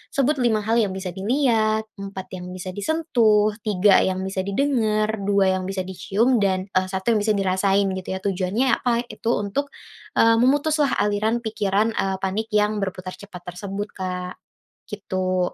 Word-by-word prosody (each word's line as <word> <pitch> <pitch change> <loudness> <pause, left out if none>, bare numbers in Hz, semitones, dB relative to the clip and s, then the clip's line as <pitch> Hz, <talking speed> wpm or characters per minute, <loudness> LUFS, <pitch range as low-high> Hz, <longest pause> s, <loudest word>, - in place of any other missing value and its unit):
sebut 280 +1 +2
5 225 -4 +2
hal 225 +3 +2
yang 200 -4 0
bisa 190 -1 -4
dilihat, 220 +1 +1 0.2
4 195 -1 -7
yang 180 - -8
bisa 185 0 -6
disentuh, 215 - +2 0.2
3 200 -1 +5
yang 190 0 0
bisa 190 0 -3
didengar, 215 -3 +1 0.2
2 195 -2 +3
yang 185 - -5
bisa 190 -1 -2
dicium, 195 +7 +1
dan, 190 -1 0
eee, 185 0 +1
1 190 +4 -1
yang 220 - +3
bisa 210 0 +1
dirasain 195 +1 +2
gitu 190 0 -4
ya. 190 - -7
Tujuannya 200 +6 +1
apa, 250 - 0 0.2
itu 220 +2 -4
untuk, 210 +8 -2 0.4
eee, 230 0 +5
memutuslah 290 +2 +2
aliran 210 +3 +1
pikiran, 210 0 0
eee, 190 0 0
panik 200 +4 -2
yang 210 0 +2
berputar 185 -1 -5
cepat 195 -3 -11
tersebut 200 +2 -4
Kak, 180 -1 -4 0.5
gitu, 185 -3 -2
205 Hz, 160 wpm, -23 LUFS, 190-225 Hz, 0.5 s, 3